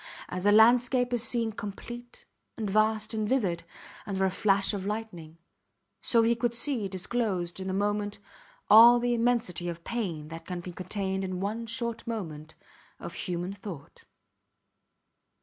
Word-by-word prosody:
As 185 +2 -2
a - - +6
landscape 245 +3 +5
is 240 - +1
seen 230 -1 0
complete, 240 +4 -8 0.3
and 220 -2 -2
vast, 215 +2 +1
and 215 -1 -1
vivid, 195 -11 0 0.4
under 190 -1 0
a 190 - +1
flash 195 +1 +2
of 200 -2 -3
lightning, 195 -6 -5 0.6
so 230 -2 +4
he 230 +1 +4
could 235 0 -1
see 235 -4 0
disclosed 190 -2 -2
in 190 0 -4
a - - -2
moment 205 +1 -1 0.5
all 230 +3 +9
the 240 0 +1
immensity 230 -8 0
of 170 0 -7
pain 175 -11 -3
that 165 0 -9
can 180 -1 -4
be 180 +1 -7
contained 190 +2 -3
in 185 -1 -3
one 220 +4 -3
short 230 0 -3
moment 160 -9 -5 0.4
of 175 - -7
human 175 +2 -3
thought. 195 -8 -10
205 Hz, 150 wpm, -28 LUFS, 185-230 Hz, 0.6 s, all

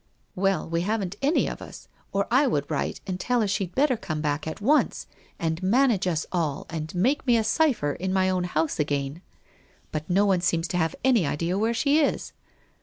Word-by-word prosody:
' - - -41
Well, 195 -2 0
we 165 +1 -1
haven't, 200 -1 -2
any 285 +5 +2
of - - -6
us, - - -11 0.2
or 200 0 0
I 270 +4 +4
would 145 - -1
write 145 - -2
and 185 -2 -4
tell 245 +4 +1
her 215 - +1
she'd 195 -2 -2
better 275 -1 +3
come 155 -8 -4
back 150 0 -2
at 160 - -5
once 280 +9 +2 0.3
and 160 +1 -2
manage 215 0 +3
us 160 -3 0
all 160 -6 -1
and 160 0 -5
make 255 +10 +1
me 240 -1 +5
a 225 - +1
cipher 220 - +2
in 185 +5 -3
my 190 0 +2
own 185 -1 0
house 160 -3 -1
again. 145 +1 -1 0.7
But 155 +2 -4
no 195 +3 +3
one 190 -3 +2
seems 170 -1 +1
to 180 - -1
have 165 -2 0
any 240 - +3
idea 165 +5 -1
where 225 +4 +1
she 285 +5 +3
is. 295 - 0
185 Hz, 210 wpm, -26 LUFS, 160-225 Hz, 0.7 s, me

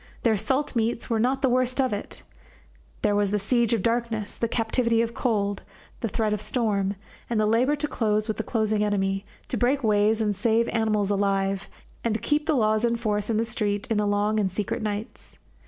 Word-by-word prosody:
Their 225 -2 +4
salt 265 +7 -1
meats 230 +1 -1
were 225 - +2
not 265 +4 +1
the 265 - +4
worst 255 +1 +1
of 260 -4 +2
it; 205 - -4 0.8
there 205 - +3
was 205 -1 +2
the 210 - +1
siege 235 +3 +1
of 230 -5 +1
darkness, 230 -3 -1
the 230 - -1
captivity 230 0 +1
of 230 0 -4
cold, 205 -6 0 0.4
the 230 - -1
threat 215 +1 0
of 210 - -2
storm, 210 -3 0 0.3
and 230 -2 0
the 215 - +3
labour 240 +7 +3
to 295 +1 -2
close 215 -4 0
with 220 - -2
the 220 - -2
closing 215 -2 0
enemy, 195 -1 0 0.2
to - - -2
break 265 +3 +1
ways 215 0 +3
and 210 -2 0
save 225 +3 +2
animals 215 -3 +1
alive, 195 -1 0 0.3
and 225 -2 -1
keep 300 +1 +1
the 315 - +3
laws 215 -2 +2
in 235 0 +2
force 210 -3 -1
in 225 - +1
the 225 - +2
street 210 -3 -1
in 220 - +2
the 210 0 +1
long 205 +1 +1
and 195 -3 0
secret 205 +5 -2
nights. 210 0 -5
220 Hz, 205 wpm, -25 LUFS, 205-235 Hz, 0.8 s, Their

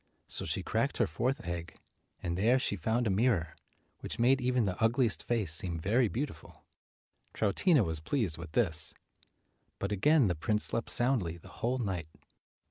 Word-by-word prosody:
So - - -3
she - - -2
cracked - - -1
her - - +3
fourth 120 - -2
egg, 85 -1 -5 0.5
and 85 -1 -2
there 115 +8 +3
she 125 - -1
found 115 +5 0
a 105 - +1
mirror 95 -6 +1 0.4
which - - -6
made 130 +3 +3
even 125 -2 +1
the 95 +1 -3
ugliest 115 0 +2
face 110 -9 -1
seem 85 +1 +2
very 110 +9 +2
beautiful. 130 +7 -6 0.7
Troutina 125 - +3
was 80 -4 -2
pleased 95 - -1
with 85 -2 -9
this. 80 -10 +3 0.8
But 100 - -3
again 140 +8 +4
the 90 - +1
prince 105 +7 -1
slept 115 - -2
soundly 120 -10 +1
the 85 - -15
whole 125 +3 -2
night. 95 -10 -3
105 Hz, 165 wpm, -31 LUFS, 85-125 Hz, 0.8 s, again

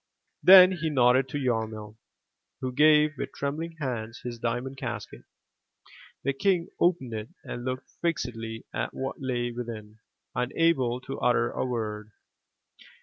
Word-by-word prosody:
*' - - -48
Then 185 -1 +11
he 165 -3 -2
nodded 130 -1 +4
to 145 - -3
Yarmil, 110 -5 -2 0.6
who 130 - -3
gave 150 +2 +5
with - - -4
trembling 160 +4 -3
hands 120 -5 -4
his 120 -1 -6
diamond 125 +3 -3
casket. - - -6 1.0
The 140 - +1
King 175 +3 +1
opened 165 -9 +1
it 110 0 -5
and 120 - -6
looked 130 0 -4
fixedly 115 -9 -3
at - - -3
what 135 +1 -4
lay 120 -2 -1
within, 110 -3 -7 0.3
unable 125 -1 +1
to 135 - -6
utter 120 0 +2
a - - -2
word. 105 -3 -4
125 Hz, 140 wpm, -27 LUFS, 115-145 Hz, 1.0 s, Then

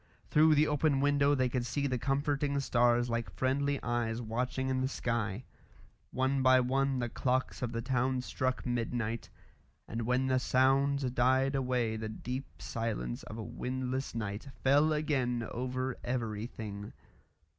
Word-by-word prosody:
Through 155 +1 +6
the 150 +1 +5
open 150 -1 +2
window 145 0 +3
they 130 -2 +2
could 125 0 -1
see 120 +4 -1
the 130 -3 0
comforting 140 +2 0
stars 120 -2 +3
like 115 -1 -2
friendly 140 +2 0
eyes 120 -1 -1
watching 125 +3 -2
in 130 0 0
the 130 - +1
sky. 115 -4 -2 0.7
One 130 +1 +1
by 130 0 +6
one 135 +2 +1
the 120 -1 -1
clocks 130 +2 -1
of 125 -2 -2
the 115 -1 -3
town 130 0 +1
struck 130 0 -2
midnight, 120 -2 -2 0.6
and 115 - -3
when 125 +1 +2
the 130 -1 +2
sounds 135 +2 +3
died 130 +2 +3
away 125 -4 0
the 110 0 -4
deep 125 +5 -6
silence 105 - -3
of 110 - -8
a 110 - -4
windless 130 +2 -3
night 105 +2 -4 0.2
fell 145 +4 +5
again 130 -6 0
over 130 +1 -2
everything. 110 -3 -4
130 Hz, 150 wpm, -32 LUFS, 120-135 Hz, 0.7 s, Through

